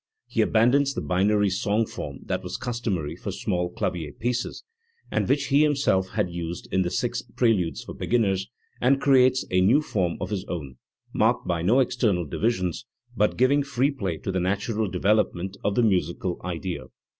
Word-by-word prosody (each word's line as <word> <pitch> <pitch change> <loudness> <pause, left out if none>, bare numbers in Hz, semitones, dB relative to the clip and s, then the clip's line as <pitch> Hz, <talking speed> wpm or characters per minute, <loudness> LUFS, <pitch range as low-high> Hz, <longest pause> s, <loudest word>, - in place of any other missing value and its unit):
He - - 0
abandons 135 +5 +3
the - - -2
binary 100 +2 +2
song 105 +3 +1
form 70 -8 -7
that - - -2
was - - -5
customary 110 -11 -3
for - - -6
small 90 -1 -1
clavier 85 -3 -3
pieces, 120 - -3 0.5
and - - 0
which 140 -1 +1
he 140 +1 +5
himself 140 -11 +2
had 105 -2 0
used 85 0 -5
in 95 - +2
the 90 - 0
six 120 +5 -1
preludes 115 -8 0
for - - -8
beginners, 100 -5 0 0.3
and 135 +2 +4
creates 130 -2 +4
a 90 0 +3
new 110 +10 +5
form 95 - -1
of - - -4
his 95 -3 -2
own, 70 -9 -6 0.4
marked - - +2
by 85 -2 0
no 110 +10 +4
external 115 -8 +1
divisions, 95 - -1 0.3
but 105 -1 +1
giving 135 +4 +4
free 140 0 +1
play 95 - -3
to 95 - -4
the 95 - 0
natural 100 +4 -1
development 95 0 +1
of 100 - 0
the 120 - +3
musical 90 -3 0
idea. 90 0 -4
100 Hz, 175 wpm, -25 LUFS, 90-120 Hz, 0.5 s, he